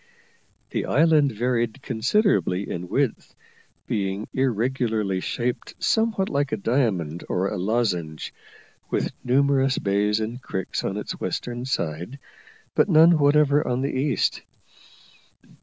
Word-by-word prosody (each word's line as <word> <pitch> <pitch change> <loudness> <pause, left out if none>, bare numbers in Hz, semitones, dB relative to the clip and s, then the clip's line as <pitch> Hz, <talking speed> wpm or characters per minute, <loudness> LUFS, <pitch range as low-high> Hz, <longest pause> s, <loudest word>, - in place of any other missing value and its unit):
The - - -2
island 150 -2 +4
varied 120 0 -1
considerably 110 - +1
in 90 +1 -5
width, - - -1 0.5
being 100 +1 -2
irregularly 115 -5 0
shaped 120 +6 -3
somewhat 220 -4 +1
like 140 0 -1
a 110 - 0
diamond 100 - 0
or 95 +2 0
lozenge, 90 -6 -1 0.6
with - - -1
numerous 135 +1 +2
bays 105 +2 +1
and 115 +4 -4
creeks 95 -6 -4
on - - -2
its - - -5
western 120 0 -3
side, 85 - -3 0.6
but - - +3
none 165 0 +6
whatever 145 0 +4
on 125 +1 0
the 140 - -2
east. 135 0 0
120 Hz, 115 wpm, -24 LUFS, 100-140 Hz, 0.6 s, none